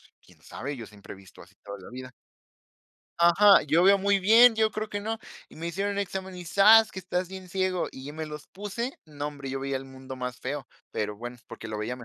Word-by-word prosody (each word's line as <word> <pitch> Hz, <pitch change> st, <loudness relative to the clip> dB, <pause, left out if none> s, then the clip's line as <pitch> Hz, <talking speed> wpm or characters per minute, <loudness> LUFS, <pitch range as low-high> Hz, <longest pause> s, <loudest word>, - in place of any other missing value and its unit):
"Pues, -, -, -24 dB
quién -, -, -22 dB
sabe, 140 Hz, +1 st, -6 dB
yo 115 Hz, -, -7 dB
siempre 105 Hz, -2 st, -12 dB
he -, -, -12 dB
visto 95 Hz, -2 st, -16 dB
así -, -, -18 dB
todo 100 Hz, 0 st, -8 dB
en 95 Hz, -, -15 dB
la -, -, -11 dB
vida". 130 Hz, +1 st, -9 dB, 1.1 s
Ajá, 195 Hz, +4 st, +6 dB
"Yo 160 Hz, +4 st, +3 dB
veo 200 Hz, +1 st, +7 dB
muy 200 Hz, 0 st, +2 dB
bien, 225 Hz, +5 st, +7 dB
yo 220 Hz, 0 st, +2 dB
creo 215 Hz, +1 st, -4 dB
que 205 Hz, -, -3 dB
no". 220 Hz, +2 st, -3 dB, 0.3 s
Y -, -, -16 dB
me 165 Hz, -, -5 dB
hicieron 200 Hz, +3 st, -2 dB
examen 190 Hz, -1 st, -4 dB
y 175 Hz, -, -8 dB
zas, 215 Hz, +5 st, +6 dB
que 190 Hz, -, -8 dB
estás 180 Hz, 0 st, -3 dB
bien 190 Hz, -1 st, -9 dB
ciego. 185 Hz, -1 st, -1 dB
Y 135 Hz, +3 st, -9 dB
me 160 Hz, 0 st, -5 dB
los 150 Hz, 0 st, -9 dB
puse, 210 Hz, +6 st, -5 dB
no, 145 Hz, -1 st, -5 dB
hombre, 140 Hz, -2 st, -8 dB
yo 135 Hz, +1 st, -3 dB
veía 135 Hz, 0 st, -2 dB
el 135 Hz, -, -10 dB
mundo 130 Hz, 0 st, -10 dB
más 125 Hz, 0 st, -5 dB
feo, 135 Hz, +1 st, -5 dB, 0.2 s
pero, 105 Hz, 0 st, -3 dB
bueno, 120 Hz, +3 st, -8 dB
porque -, -, -9 dB
lo 110 Hz, -, -4 dB
veía 115 Hz, +4 st, -3 dB
ma 125 Hz, -, -11 dB
170 Hz, 245 wpm, -27 LUFS, 130-200 Hz, 1.1 s, veo